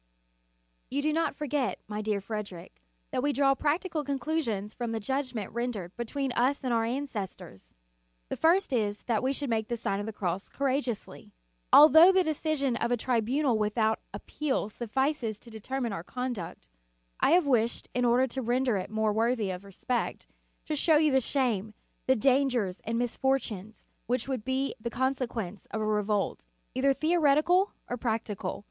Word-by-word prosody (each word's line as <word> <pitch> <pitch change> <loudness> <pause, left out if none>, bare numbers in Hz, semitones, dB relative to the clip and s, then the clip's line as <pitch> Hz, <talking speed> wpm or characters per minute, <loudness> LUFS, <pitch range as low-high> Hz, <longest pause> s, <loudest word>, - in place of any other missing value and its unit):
You 285 +2 -1
do 305 0 +1
not 325 -2 0
forget, 280 -8 -1
my 210 0 -4
dear 210 -1 0
Frederic, 195 - -7 0.3
that - - 0
we 290 +2 +1
draw 275 -1 +3
practical 310 +3 -1
conclusions 265 -7 -2
from 235 -2 -3
the 225 - -1
judgment 255 -3 -3
rendered 225 -7 -3
between 265 +3 -2
us 255 +4 +1
and 255 -2 0
our 225 -1 +2
an 260 +5 -1
cestors. 185 - -7 0.6
The - - -2
first 340 -1 +3
is, 210 -4 0
that 230 -3 0
we 260 - +1
should 275 -2 -3
make 220 -1 0
the 235 - -2
Sign 200 -3 -2
of 205 - -4
the - - -3
Cross 185 -1 -3
courageously. 265 -4 -3 0.4
Although 315 +4 +9
the 375 -1 +4
decision 310 -5 0
of 235 - -1
a 245 - +3
tribunal 245 +2 +1
without 220 +1 +1
appeal 280 -8 -2
suffices 240 0 -1
to 235 - -15
determine 235 +1 -3
our 165 - -5
conduct, 250 - -5 0.5
I 300 - +4
have 355 -2 +5
wished, 235 -4 +1
in 250 - 0
order 245 +2 +4
to 265 +1 -4
render 245 -1 +1
it 185 - -4
more 220 -1 +1
worthy 225 -2 +1
of 180 +1 -6
respect, 200 +5 -3 0.4
to 310 - -2
show 310 +1 +4
you 305 -1 +3
the 265 0 +4
shame, 225 -6 -1 0.3
the 260 - +5
dangers 250 -6 +2
and 230 +1 -1
misfortunes 235 -4 -2 0.2
which 245 +1 0
would 260 -5 -2
be 265 +2 -1
the 235 - -3
consequence 240 -7 -2
of 220 - -3
a 215 - -1
revolt, 210 - 0 0.3
either 270 +2 +3
theoretical 320 +5 +3
or 245 - -3
practical. 220 -5 -3
245 Hz, 170 wpm, -29 LUFS, 215-275 Hz, 0.6 s, Although